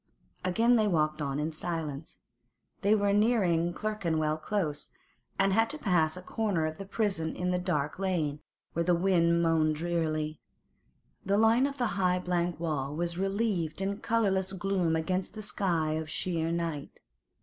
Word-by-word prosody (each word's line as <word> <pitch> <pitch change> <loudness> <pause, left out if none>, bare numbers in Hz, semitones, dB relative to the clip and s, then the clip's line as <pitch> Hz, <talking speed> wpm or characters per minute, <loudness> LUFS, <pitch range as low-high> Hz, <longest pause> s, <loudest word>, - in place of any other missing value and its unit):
Again 230 +7 +3
they 215 -1 +3
walked 155 -4 +1
on 140 0 -2
in 155 +2 -1
silence. 155 -2 -4 0.6
They 205 +2 +4
were 200 -1 +2
nearing 195 -6 +3
Clerkenwell 165 -7 -1
Close, 155 -4 -2 0.5
and 195 0 +3
had 225 +2 +3
to 305 - -2
pass 175 - +1
a 180 - -8
corner 200 -6 0
of 155 0 -4
the 195 - -7
prison 195 -7 -1
in 180 0 -1
a 180 - +1
dark 155 -4 -1
lane, 165 -7 -1 0.3
where 170 - 0
the 175 +1 +3
wind 170 -2 +3
moaned 160 -2 +2
drearily. 155 -2 -1 0.8
The 200 +1 +1
line 225 +5 +4
of 280 0 -6
the 245 - +1 0.2
high 180 -1 +3
blank 175 -2 -1
wall 150 -4 -2
was 170 +1 -2
relieved 195 -5 -1
in 200 +1 -2
colourless 195 -4 +1
gloom 185 -3 0
against 185 +5 -2
a 215 - -5
sky 175 -7 0
of 155 0 -3
sheer 165 0 -1
night. 165 -4 -3
175 Hz, 160 wpm, -29 LUFS, 160-195 Hz, 0.8 s, They